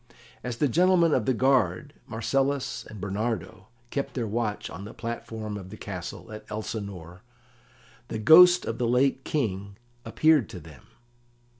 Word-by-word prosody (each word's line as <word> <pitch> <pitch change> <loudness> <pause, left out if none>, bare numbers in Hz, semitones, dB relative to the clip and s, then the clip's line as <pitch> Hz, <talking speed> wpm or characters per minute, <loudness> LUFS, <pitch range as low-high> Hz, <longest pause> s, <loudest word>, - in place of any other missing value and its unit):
As 125 -2 -4
the 145 - +2
Gentlemen 170 +2 +4
of 120 - +1
the 130 - +3
Guard, 130 - +1
Marcellus 135 +5 -1
and 105 - -9
Bernardo, 100 -1 -3 0.2
kept 140 - -3
their 120 -3 -1
watch 110 -1 -2
on 90 +4 -8
the 105 - -10
platform 110 -2 -5
of 95 -2 -9
the 110 - -10
castle 95 +3 -7
at 110 0 -8
Elsinore 100 -5 -6 0.9
the - - -4
Ghost 175 +10 +7
of 115 - -4
the 120 - +1
late 130 +2 +2
King 100 -8 -2 0.3
appeared 145 +4 +3
to 90 - -8
them. 75 -3 -15
110 Hz, 150 wpm, -27 LUFS, 100-135 Hz, 0.9 s, Ghost